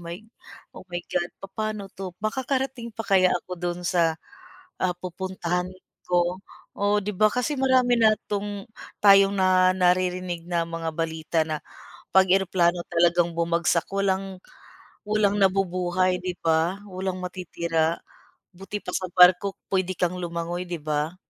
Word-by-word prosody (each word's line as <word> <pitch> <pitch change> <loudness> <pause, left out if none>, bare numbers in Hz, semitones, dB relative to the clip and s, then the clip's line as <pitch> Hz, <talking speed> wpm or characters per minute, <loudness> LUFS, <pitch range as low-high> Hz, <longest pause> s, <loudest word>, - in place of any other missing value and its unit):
my 170 0 -6 0.6
oh - - -11
my 175 - -5 0.2
god," 175 -1 0
papa'no 205 0 -5
'to, 185 -2 -7
makakarating 260 +1 -2
pa 225 0 -7
kaya 190 -2 +4
ako 180 - -11
do'n 175 0 -3
sa, 170 -3 +2 0.6
ah 180 -1 0
pupuntahan 180 0 -3 0.4
ko. 175 +1 +1 0.4
Oo, 205 0 +2
'di 210 - -2
ba 215 +2 +4
kasi 250 +6 -1
marami 255 -2 +3
na 215 -1 +5
'tong 205 -1 -4 0.4
tayong 195 0 +7
na 185 -1 +4
naririnig 180 -1 0
na 170 -1 0
mga 165 0 -4
balita 160 0 -1
na 155 -1 -4 0.5
'pag 190 0 +5
eroplano 180 -2 +1
talagang 175 0 +3
bumagsak 170 0 +1
walang 195 -1 -1 0.7
walang 205 -1 +2
nabubuhay 185 -1 +1
'di 180 -1 -4
ba, 165 +3 +2
walang 190 -1 -4
matitira. 170 -2 -1 0.5
Buti 195 +3 -7
pa - - -5
sa 185 +1 -2
barko 180 +2 +6 0.2
puwede 185 -1 0
kang 180 0 -1
lumangoy, 175 0 -4
'di 175 -3 -5
ba. 155 +3 -2
185 Hz, 140 wpm, -25 LUFS, 175-195 Hz, 0.7 s, tayong